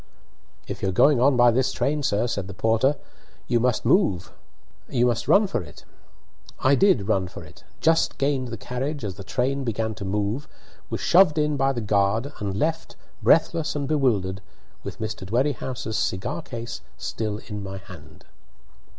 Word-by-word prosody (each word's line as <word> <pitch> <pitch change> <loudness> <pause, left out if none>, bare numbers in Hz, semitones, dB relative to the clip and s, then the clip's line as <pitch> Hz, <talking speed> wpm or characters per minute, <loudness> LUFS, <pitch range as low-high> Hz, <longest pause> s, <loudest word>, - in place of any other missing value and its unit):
"If - - -6
you're 95 - 0
going 135 +7 +4
on 135 0 +4
by 120 -1 +6
this 130 +2 +1
train, 150 +1 0
sir," 105 -4 +1
said 100 -5 -3
the 100 - -8
porter, 115 +6 +2 0.5
"you 120 -1 +1
must 125 -1 0
run 120 - +1
for 190 - -2
it." 75 -4 -13 0.7
I 130 - +3
did 140 - +3
run 95 -4 +1
for 90 - -10
it, 85 +5 -16 0.2
just 165 0 +2
gained 135 -2 0
the 115 -1 -6
carriage 130 +6 -4
as 100 - -3
the 100 - -10
train 135 +7 -1
began 110 -2 -2
to 100 - -8
move, 105 +7 -2 0.4
was - - -3
shoved 170 -3 +5
in 150 -1 +1
by 135 0 +2
the 120 -3 -3
guard, 105 +6 +1
and 100 -2 -3
left, 160 +6 -2 0.3
breathless 165 -1 +3
and 140 -2 -2
bewildered, 105 -10 +1 0.4
with - - -7
Mr. 110 -2 -4
Dwerrihouse's 120 0 -1
cigar 125 - -2
case 115 - -7 0.2
still 105 - -3
in 105 -2 -6
my 95 0 -6
hand. 90 -5 -13
120 Hz, 160 wpm, -24 LUFS, 100-140 Hz, 0.7 s, by